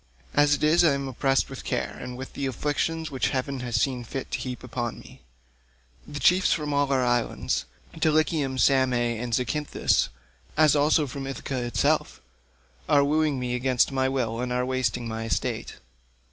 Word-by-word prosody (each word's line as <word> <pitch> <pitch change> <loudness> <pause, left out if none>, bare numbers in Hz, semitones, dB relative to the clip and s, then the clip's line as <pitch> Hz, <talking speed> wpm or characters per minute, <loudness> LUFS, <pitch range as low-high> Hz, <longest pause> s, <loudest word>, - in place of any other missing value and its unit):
As 145 0 +4
it - - -6
is, 160 +3 +5
I 160 -4 +5
am 140 0 -3
oppressed 135 +1 +1
with - - -8
care, - - -2
and 125 0 -6
with 130 +1 -8
the 140 - -2
afflictions 155 +4 -2
which 130 - 0
heaven 135 +1 -2
has 120 -3 -3
seen 125 -1 0
fit 130 +3 -6
to - - -2
heap 125 -1 -5
upon 120 -2 -4
me. - - -14 0.9
The 145 -1 -6
chiefs 180 +4 +4
from 150 -2 0
all 140 -1 +1
our 130 -2 +2
islands—Dulichium, 130 - 0
Same, 130 -1 +3
and 120 0 -1
Zacynthus, 140 +5 +1 0.5
as 155 -1 +5
also 150 +1 +3
from 135 0 -6
Ithaca 135 -1 -4
itself, 120 0 0 0.7
are 145 -2 +5
wooing 150 -1 +1
me 125 -1 -2
against 125 +1 +2
my 130 -1 +1
will 120 -3 -1
and 125 0 -3
are 125 0 0
wasting 130 -2 -1
my 110 0 -4
estate. 115 - -2
130 Hz, 170 wpm, -26 LUFS, 125-145 Hz, 0.9 s, is